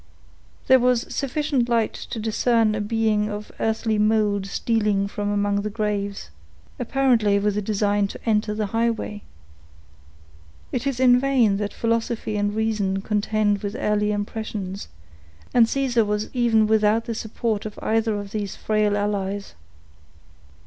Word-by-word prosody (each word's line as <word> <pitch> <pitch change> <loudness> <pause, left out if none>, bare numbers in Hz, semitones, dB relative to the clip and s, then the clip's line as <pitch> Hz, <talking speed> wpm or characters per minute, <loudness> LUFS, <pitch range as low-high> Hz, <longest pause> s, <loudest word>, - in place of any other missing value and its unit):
There 260 0 +6
was 250 -1 +2
sufficient 275 -2 -1
light 230 -2 +1
to - - -7
discern 225 0 +2
a 210 - -2
being 215 -1 +1
of 210 0 -6
earthly 220 -1 0
mold 210 -2 +2
stealing 210 -2 0
from 205 0 -3
among 205 0 +1
the 210 - -3
graves, 205 - -3 0.5
apparently 240 -5 +2
with 205 0 0
a 210 - 0
design 205 0 +1
to - - -9
enter 210 -1 +1
the 215 0 -1
highway. 225 -1 -1 1.5
It 255 +2 -2
is 265 -3 -2
in 250 -1 +6
vain 250 -7 +2
that 205 0 -3
philosophy 230 -1 -1
and 205 0 0
reason 210 -3 0
contend 210 -1 +1
with 205 +1 -4
early 210 -2 0
impressions, 205 -2 -4 0.7
and 230 -2 +6
poor - - -8
Caesar 255 -4 +1
was 210 0 -2
even 235 -3 +3
without 220 +1 +2
the 230 - -3
support 220 -1 -2
of 210 - -11
either 220 -1 +1
of 200 -1 -8
these 205 -2 -3
frail 210 -1 +1
allies. 205 -1 -2
215 Hz, 145 wpm, -23 LUFS, 205-230 Hz, 1.5 s, There